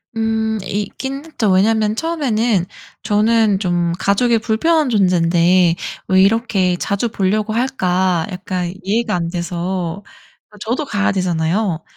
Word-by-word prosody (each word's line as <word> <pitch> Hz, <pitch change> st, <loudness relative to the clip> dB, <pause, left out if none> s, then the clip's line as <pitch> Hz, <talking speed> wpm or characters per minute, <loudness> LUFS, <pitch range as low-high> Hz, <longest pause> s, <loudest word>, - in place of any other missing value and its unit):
음 220 Hz, 0 st, 0 dB
있긴 265 Hz, +9 st, -4 dB
했죠. 230 Hz, -11 st, -1 dB
왜냐하면 215 Hz, +3 st, +2 dB
처음에는 235 Hz, -, 0 dB, 0.4 s
저는 215 Hz, -1 st, +2 dB
좀 175 Hz, -3 st, 0 dB
'가족의 230 Hz, +4 st, +2 dB
불편한 285 Hz, +7 st, +1 dB
존재인데 180 Hz, -3 st, +3 dB, 0.3 s
왜 190 Hz, 0 st, +4 dB
이렇게 195 Hz, -3 st, +2 dB
자주 200 Hz, +5 st, -1 dB
보려고 215 Hz, +1 st, -1 dB
할까.' 185 Hz, -8 st, 0 dB
약간 180 Hz, -1 st, -4 dB
이해가 215 Hz, +2 st, 0 dB
안 170 Hz, -1 st, -2 dB
돼서 175 Hz, +1 st, -3 dB, 0.5 s
어 210 Hz, -, -16 dB
저도 245 Hz, +8 st, -2 dB
가야 205 Hz, -5 st, 0 dB
되잖아요. 175 Hz, -1 st, -1 dB
205 Hz, 270 characters per minute, -18 LUFS, 180-225 Hz, 0.5 s, 왜